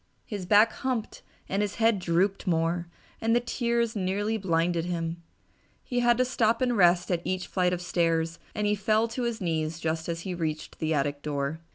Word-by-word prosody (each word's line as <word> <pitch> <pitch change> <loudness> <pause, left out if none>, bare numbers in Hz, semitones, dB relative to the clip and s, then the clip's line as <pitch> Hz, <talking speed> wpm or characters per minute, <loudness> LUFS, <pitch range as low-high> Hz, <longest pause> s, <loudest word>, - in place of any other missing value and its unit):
His 200 -4 -5
back 215 +3 +6
humped 250 -4 -3 0.3
and 195 +2 0
his 205 -1 -2
head 225 -2 +3
drooped 185 +3 0
more, 170 0 +1 0.3
and 225 +1 +2
the - - +5
tears 235 -1 -1
nearly 205 +3 0
blinded 170 -4 0
him. 170 -1 -3 0.6
He 245 -2 -1
had 240 -1 +4
to 255 - +3
stop 230 -2 +2
and 245 -2 +1
rest 175 -2 +4
at 170 -2 +1
each 185 0 -2
flight 180 -1 +1
of 180 0 -2
stairs 165 -1 0 0.2
and 210 - -1
he 205 - +3
fell 215 +2 +2
to 235 +3 -4
his 235 -2 -1
knees 160 -2 -1
just 160 0 -2
as 165 0 -3
he 185 +1 -4
reached 160 -3 -4
the 160 0 -1
attic 145 0 -1
door. 145 +1 -2
185 Hz, 195 wpm, -27 LUFS, 165-220 Hz, 0.6 s, back